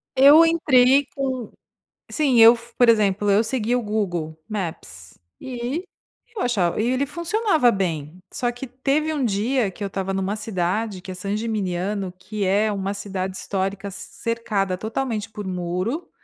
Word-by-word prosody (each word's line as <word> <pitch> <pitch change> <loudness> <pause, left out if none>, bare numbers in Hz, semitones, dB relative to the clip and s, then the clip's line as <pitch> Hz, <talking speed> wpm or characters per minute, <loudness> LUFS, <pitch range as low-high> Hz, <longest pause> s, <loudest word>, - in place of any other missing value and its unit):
Eu 290 +5 +8
entrei 280 -4 +4
com 260 -4 -3 0.6
sim 275 -6 +2
eu 230 +1 +9
fu 235 0 -14
por 245 -2 +5
exemplo, 205 -2 +3
eu 205 +3 +4
segui 240 0 0
o 250 - +1
Google 175 -7 -2
Maps 165 - -6 0.2
e 255 +6 -4 0.5
eu 425 - -3
achava 210 -5 +1
e 235 - 0
ele 255 +2 +1
funcionava 340 - +2
bem, 165 -4 -3
só 245 -1 -1
que 245 +3 -7
teve 275 +5 0
um 285 -4 -1
dia 225 +2 +1
que 205 - -8
eu 200 - -1
estava 195 0 -3
numa 195 +1 -1
cidade 205 -1 -2
que 190 - -8
é - - -5
Sangimignano, 200 -1 -2
que 205 +1 -4
é 210 +3 +2
uma 195 0 -2
cidade 190 -2 -4
histórica 195 +1 -3
cercada 200 -2 -3
totalmente 220 0 -3
por 210 -2 -7
muro 185 - -3
215 Hz, 155 wpm, -23 LUFS, 190-250 Hz, 0.6 s, eu